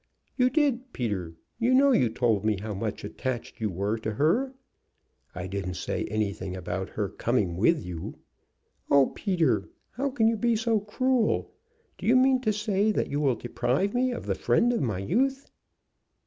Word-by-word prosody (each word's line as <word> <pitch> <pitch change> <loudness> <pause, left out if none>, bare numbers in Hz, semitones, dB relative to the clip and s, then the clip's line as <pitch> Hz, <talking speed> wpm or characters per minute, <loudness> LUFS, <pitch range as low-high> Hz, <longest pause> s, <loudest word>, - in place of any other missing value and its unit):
"You 250 -1 +3
did, 260 -3 0
Peter. 95 -9 -3 0.2
You 245 +2 +3
know 280 +1 +5
you 125 - +3
told 110 -3 +1
me 110 -2 +1
how 105 +1 -5
much 105 +2 -4
attached 130 -3 -5
you 110 - 0
were 100 +5 -2
to 110 0 -3
her." 175 - +2 0.8
"I 90 0 -4
didn't 95 -1 -4
say - - -3
anything 100 -3 -2
about 95 +1 -4
her 105 -2 -2
coming 100 -4 -1
with 150 - +2
you." 85 -2 -6 0.7
"Oh, 140 -1 +5
Peter, 175 - 0 0.2
how 275 +4 -2
can 240 -5 +2
you 225 0 +2
be 235 +1 +2
so 225 0 +1
cruel? 235 +3 0 0.5
Do - - -4
you 240 - +5
mean 260 0 +4
to 215 -4 +1
say 210 0 +1
that 210 - -1
you 145 - 0
will 135 -4 +2
deprive 130 - -1
me 255 +1 +2
of 245 - -5
the - - 0
friend 240 +1 +2
of 235 - 0
my 110 -8 -1
youth?" 265 - 0
145 Hz, 175 wpm, -27 LUFS, -, 0.8 s, know